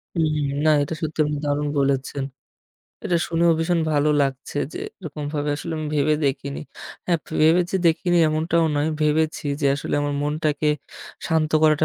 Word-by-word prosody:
হুম, 155 -2 +1 0.3
না - - +6
এটা 145 - -4
সত্যি 160 0 -4
আপনি 150 0 -2
দারুণ 145 0 0
বলেছেন। 135 0 0 0.8
এটা 175 - +1
শুনেও 170 0 +3
ভীষণ 165 +1 +1
ভালো 145 0 +2
লাগছে 135 0 -3 0.2
যে - - -6 0.2
এরকমভাবে 150 -3 -4
আসলে 165 +2 -5
আমি 155 - -3
ভেবে 150 +1 +3
দেখিনি। 140 0 -2 0.5
হ্যাঁ, 175 -2 +2 0.2
ভেবে 160 +3 +5
যে - - +1
দেখিনি 175 +2 +2
এমনটাও 160 +2 +1
নয়। 145 +2 +1
ভেবেছি 155 +1 +1 0.2
যে 140 - +2
আসলে 140 - -3
আমার 145 0 -1
মনটাকে 150 0 -1 0.6
শান্ত 160 -2 +1
করাটা 155 0 +4
155 Hz, 155 wpm, -23 LUFS, 145-160 Hz, 0.8 s, না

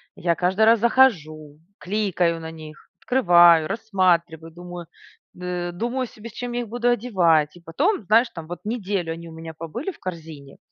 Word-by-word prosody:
я 170 -1 0
каждый 190 +4 +2
раз 225 0 +5
захожу, 155 - +1 0.2
кликаю 180 -4 -1
на 160 - -7
них, 155 -1 -13
открываю, 175 -9 +5
рассматриваю, 175 -7 0
думаю 175 0 -9 0.5
д 180 -1 -4
думаю 240 +6 -3
себе, 225 +1 -11
с - - -17
чем 245 0 -5
я 245 - -1
их 230 - -8
буду 240 +1 0
одевать 175 -10 +2
и - - -17
потом, 275 - -1
знаешь 230 +4 +4
там, 165 -3 -10 0.2
неделю 200 -6 -3
они 170 +1 -10
у - - -12
меня 160 0 -9
побыли 165 - -6
в - - -19
корзине, 160 -6 -9
180 Hz, 170 wpm, -23 LUFS, 165-225 Hz, 0.5 s, раз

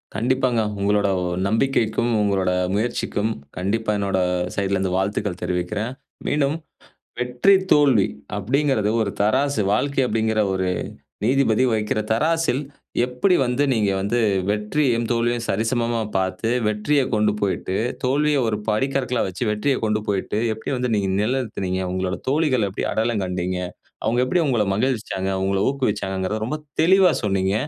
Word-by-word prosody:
கண்டிப்பாங்க. 125 +2 +1 0.2
உங்களோட 100 +1 +2 0.4
நம்பிக்கைக்கும், 115 +1 +1
உங்களோட 95 -3 +1 0.2
முயற்சிக்கும் 110 -1 -1 0.3
கண்டிப்பா 105 +4 -1
என்னோட 100 -2 0 0.4
சைட்லருந்து 95 -2 0
வாழ்த்துக்கள் 95 -1 -2
தெரிவிக்கிறேன். 100 +6 -2 0.4
மீண்டும் 145 0 +1 0.6
வெற்றி, 125 +9 +3 0.2
தோல்வி 135 -9 +5 0.3
அப்டிங்குறது 120 0 +1
ஒரு 100 - -1
தராசு 130 +5 +2
வாழ்க்கை 135 +5 +1
அப்டிங்குற 110 -1 0
ஒரு 95 0 -1 0.6
நீதிபதி 130 -1 +3
வக்கிற 110 -1 0
தராசில் 155 +3 +1 0.4
எப்படி 125 +10 +1
வந்து 125 +3 0
நீங்க 105 -4 +2
வந்து 105 +5 0 0.3
வெற்றியும், 115 +3 0
தோல்வியும் 120 0 0
சரிசமமா 115 +2 0 0.2
பார்த்து 95 +4 -1 0.2
வெற்றியக் 125 +6 0
கொண்டு 105 -1 +2
போய்ட்டு 95 -1 -1 0.3
தோல்விய 145 +3 +2
ஒரு 105 - 0
படிக்கற்களா 125 +2 0
வச்சு 95 +5 -7
வெற்றிய 130 +6 0
கொண்டு 105 0 0
போய்ட்டு, 100 +1 -1 0.2
எப்படி 110 +5 -5
வந்து 125 -1 -1
நீங்க 100 -2 0
நெலைநிறுத்தினீங்க? 105 -6 -1
உங்களோட 95 0 -2
தோழிகள் 135 -6 +2
எப்படி 95 - -4
அடையாளம் 110 -2 0
கண்டீங்க? 90 0 -2 0.5
அவங்க 115 +3 +2
எப்படி 175 +8 +1
உங்கள 120 -6 +2
மகிழ்விச்சாங்க? 110 -4 -1
உங்கள 95 0 +1
ஊக்குவிச்சாங்கறத 105 -5 -2
ரொம்ப 150 +6 -3 0.2
தெளிவா 190 +2 +5
சொன்னீங்க. 95 -1 +1
110 Hz, 125 wpm, -22 LUFS, 100-130 Hz, 0.6 s, தோல்வி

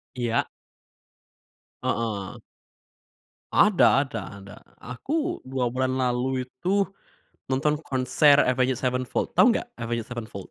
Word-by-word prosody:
Iya. 120 -2 0 1.4
Heeh. 105 -4 -3 1.1
Ada 175 -8 +5
ada 115 -5 -5 0.2
ada. 100 +1 -12 0.2
Aku 300 - -3
2 130 -1 -2
bulan 130 0 0
lalu 130 0 0
itu 190 +10 0 0.6
nonton 150 +3 0
konser 140 +1 +3
Avenged 130 0 +1
Sevenfold. 125 0 -1
Tahu - - +6
nggak - - -3
Avenged 115 0 -2
Sevenfold? 110 -5 -7
130 Hz, 105 wpm, -25 LUFS, 120-140 Hz, 1.4 s, Tahu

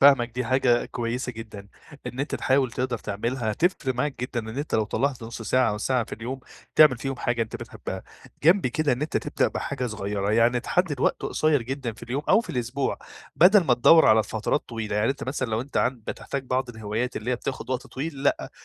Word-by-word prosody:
فاهمَك 135 -4 +6
دي 125 +2 -3
حاجة 125 -1 +3
كويّسة 120 +1 -3
جدًا، 105 -3 -9 0.4
إن 130 - -4
أنتَ 145 - -2
تحاوِل 130 -2 +2
تِقدَر 125 -2 -2
تعملها 110 +2 -2
هتفرق 135 - 0
معاك 135 0 -2
جدًا 125 -1 -2
إن 110 +4 -7
أنتَ 150 - -3
لو 110 -1 +3
طلَّعت 130 +3 -1
نص 115 0 -7
ساعة 125 +2 +2
أو 105 - -3
ساعة 125 +1 +1
في - - -15
اليوم 125 +4 -6 0.3
تِعمِل 145 -6 +7
فيهم 135 +1 -3
حاجة 120 -1 0
أنت 110 - -5
بتحبها. - - -7 0.4
جَنب 180 +1 +5
كده 145 +3 +1
إن 125 +4 -2
أنتَ 155 - -1
تبدأ - - 0
بحاجة 125 - -3
صغيّرة، 105 -2 -2
يعني 120 +2 +3
تحدد - - 0
وقت - - +1
قصيّر 155 -5 +1
جدًا 130 -1 -4
في 110 - -17
اليوم 135 +5 -3
أو 220 - +6
في - - -8
الإسبوع، 125 +2 -2 0.4
بدل 190 +2 +7
ما 125 -5 +4
تدوَّر 160 +7 +6
على 110 0 +6
فترات 110 +7 -1
طويلة، 110 -3 -3
يعني 110 +5 +2
أنت 140 - -4
مثلًا 130 -2 -2
لو 110 +1 0
أنت 140 +3 -7
عند 120 -3 0
بتحتاج 135 -1 -4
بعض 130 0 -1
الهِوايات 110 +2 -3
اللي 110 +4 -3
هي 125 - +1
بتاخد 130 +1 -5
وقت 130 -1 -2
طويل 140 0 -5
لأ، 140 - +1
125 Hz, 210 wpm, -25 LUFS, 115-135 Hz, 0.4 s, تِعمِل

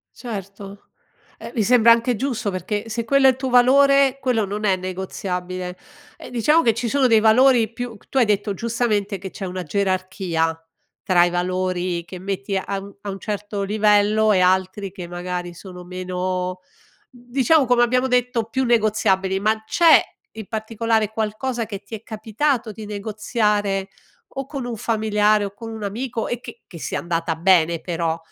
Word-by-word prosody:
Certo. 200 -3 -8 0.6
Eh, - - -7
mi 225 - +2
sembra 235 +1 +5
anche 235 +1 0
giusto 240 -4 -2
perché 205 +4 -4
se 230 +1 -3
quello 275 +2 +4
è - - +8
il - - -6
tuo 265 0 -3
valore, 275 +2 +5
quello 245 -5 +1
non 205 +2 -4
è 195 -2 +3
negoziabile. 185 -1 -5 0.4
E - - -10
diciamo 295 +7 +3
che 230 -7 +3
ci 235 +1 -3
sono 270 +1 +3
dei 225 -2 +5
valori 230 0 +5
più 240 0 -6
c - - -27
tu - - -3
hai 250 - +5
detto 205 -1 0
giustamente 215 -2 -1
che 190 +1 -7
c'è 195 - -7
una 185 0 -5
gerarchia 185 -3 -1 0.4
tra 180 -3 +4
i 175 - +2
valori 180 0 -1
che 185 +1 -9
metti 195 +1 -3
a 195 +1 -3
mhmm, 200 0 -12
a 205 - -6
un 195 0 -5
certo 205 -1 -4
livello 210 +1 +3
e 185 - +3
altri 190 +2 +1
che 180 -2 -8
magari 175 0 -5
sono 180 0 -11
meno, 185 0 -3 0.5
mhmm, 245 -2 -18
diciamo, 275 +3 +4
come 245 0 +4
abbiamo 250 +2 +2
detto, 250 -2 +1
più 260 +4 -2
negoziabili, 210 -5 +1
ma 215 +1 +1
c'è 330 +8 +6 0.3
in 220 -2 -8
particolare 220 0 -1
qualcosa 225 +3 -2
che 200 -2 -6
ti 210 +3 -7
è 210 - -11
capitato 225 +3 -1
di 215 +1 -9
negoziare 210 -1 -1 0.4
o 270 0 -4
con 275 -1 -6
un 240 -2 -4
familiare 215 -1 +2
o 200 -1 -5
con 225 +2 -8
un 220 -1 -7
amico 225 +3 -3
e 240 - -2
che 235 -1 -11
che 170 - -11
sia - - -3
andata 165 -1 -2
bene 170 -1 +3
però? 165 -2 -2
210 Hz, 180 wpm, -21 LUFS, 185-235 Hz, 0.6 s, è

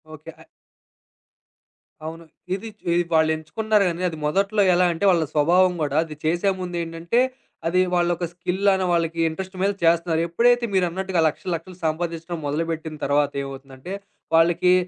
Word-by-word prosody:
Okay. 155 +2 -11
అ - - -17 1.6
అవును. 165 +1 -7 0.3
ఇదిచ్ 210 +1 -9
ఇది 175 - +3
వాళ్ళెంచుకున్నారు 160 +7 +1
గానీ, 170 +1 -5
అది 160 - -7
మొదట్లో 200 +6 +1
ఎలా 180 +1 +4
అంటే, 165 +5 -2
వాళ్ళ 170 -2 +2
స్వభావం 180 +5 +4
గూడా 145 -1 0
అది 155 -2 -9
చేసే 175 +5 +2
ముందేంటంటే, 170 +3 -2 0.5
అది 180 +2 +2
వాళ్లొక 175 0 +1
స్కిల్‌లాన 190 +2 +1
వాళ్ళకి 165 -1 0
ఇంట్రెస్ట్ 190 +4 -7
మీద 200 - +3
చేస్తున్నారు. 165 0 +3
ఎప్పుడైతే 240 +7 +3
మీరన్నట్టుగా 185 0 0
లక్షలు 180 +4 -4
లక్షలు 175 +2 -9
సంపాదించడం 165 +1 -2
మొదలుబెట్టిన 160 +1 -3
తర్వాత 145 0 +2
ఏమవుతుందంటే, 135 +5 -9 0.4
వాళ్ళకి 170 +2 +4
170 Hz, 135 wpm, -23 LUFS, 160-185 Hz, 1.6 s, ఎలా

